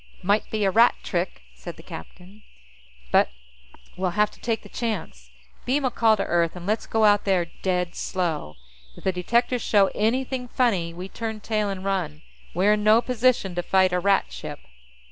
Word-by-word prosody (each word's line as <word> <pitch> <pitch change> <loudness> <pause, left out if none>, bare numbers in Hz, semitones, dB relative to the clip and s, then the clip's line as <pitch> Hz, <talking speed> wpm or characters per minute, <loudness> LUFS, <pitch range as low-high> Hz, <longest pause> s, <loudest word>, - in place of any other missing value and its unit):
"Might 205 +3 +1
be 215 -1 -1
a 195 - +3
Rat 230 +4 +5
trick," 175 - -3
said - - -9
the - - -13
captain. 180 - -11 0.7
"But - - +4 0.7
we'll 185 0 -2
have 210 0 +3
to - - -18
take 225 -1 -2
the - - -11
chance. 170 - -5 0.3
Beam 275 +2 0
a 255 - +1
call 225 -2 +3
to 195 - 0
Earth, 170 -1 +1
and 175 -1 -8
let's 215 +3 -1
go 220 -1 +2
out 205 -1 +4
there 185 -3 +2 0.2
dead 180 -2 0
slow. 165 - -3 0.4
If - - -13
the 190 - +2
detectors 235 +7 0
show 200 -2 +3
anything 250 +3 -1
funny, 205 -10 +1
we 180 +3 -7
turn 220 +1 -5
tail 215 -1 -1
and 195 -1 -5
run. 165 -6 -2 0.3
We're 195 +4 +4
in 210 0 -1
no 215 +2 +6
position 245 -6 +1
to 175 - -1
fight 185 0 +2
a 180 - +2
Rat 195 - +2
ship." - - -7
195 Hz, 185 wpm, -24 LUFS, 180-220 Hz, 0.7 s, no